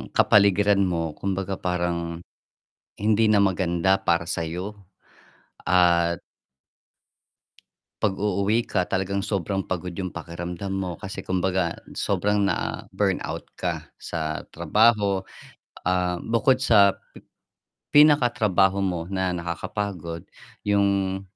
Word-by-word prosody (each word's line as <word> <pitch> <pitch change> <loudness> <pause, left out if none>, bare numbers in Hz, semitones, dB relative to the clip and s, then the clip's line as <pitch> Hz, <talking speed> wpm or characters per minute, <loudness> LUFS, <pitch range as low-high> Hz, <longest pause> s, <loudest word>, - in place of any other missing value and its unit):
kapaligiran 100 0 +4
mo 85 -3 -1
kumbaga 95 +3 -3
parang 85 -1 -2 0.8
hindi 110 +1 +3
na 105 - +4
maganda 95 -1 +2
para 85 -3 0
sa'yo 90 +6 -3 0.9
at 85 -1 +3 1.8
'pag 100 -3 +1
uuwi 105 +3 +1
ka 90 -4 -1
talagang 95 +1 -1
sobrang 95 0 -2
pagod 90 -1 -4
yung 95 +2 -4
pakiramdam 85 +3 -6
mo 95 -2 -3
kasi 95 - -6
kumbaga, 90 -1 -1 0.2
sobrang 100 +1 0
na-burnout 85 - -2 0.2
ka - - -3
sa 80 -2 -3 0.2
trabaho. 100 +3 +3 0.6
Ah, 90 -1 +1
bukod 125 +3 +2
sa 100 -6 +5 1.0
pinakatrabaho 120 - +4
mo 90 -4 -1
na 95 -1 0
nakakapagod, 85 0 -4 0.4
yung 100 -2 +1
95 Hz, 95 wpm, -24 LUFS, 85-100 Hz, 1.8 s, sa